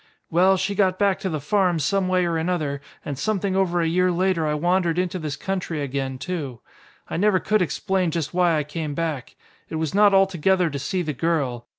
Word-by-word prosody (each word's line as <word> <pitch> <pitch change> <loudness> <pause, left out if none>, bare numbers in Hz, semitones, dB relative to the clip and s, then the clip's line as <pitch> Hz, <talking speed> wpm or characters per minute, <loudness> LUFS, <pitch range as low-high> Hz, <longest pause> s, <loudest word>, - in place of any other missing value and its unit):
Well, 185 +3 +4
she 190 +2 -1
got 185 -2 +2
back 200 -1 +2
to 190 - -2
the 155 -3 -2
farm 180 +3 +1
some 185 +6 0
way 185 -1 +2
or 170 -1 -1
another, 160 -4 -1 0.2
and 140 -2 -4
something 200 -1 -1
over 175 -2 +1
a 165 - +1
year 180 +2 +2
later 175 -2 +1
I 150 - 0
wandered 175 +1 +1
into 180 0 -1
this 150 -3 -4
country 185 -5 -3
again 135 -1 -3
too. 135 -4 -5 0.5
I - - -4
never 200 0 +3
could 215 +2 +1
explain 180 +2 0
just 160 -1 -3
why 175 -2 +3
I 150 - 0
came 150 0 -5
back. 155 -6 -3 0.3
It - - -5
was 160 -2 -2
not 205 0 +5
altogether 190 -2 +3
to 140 - -4
see 180 +7 -2
the 155 -2 -3
girl. 135 -5 -1
175 Hz, 210 wpm, -23 LUFS, 150-190 Hz, 0.5 s, not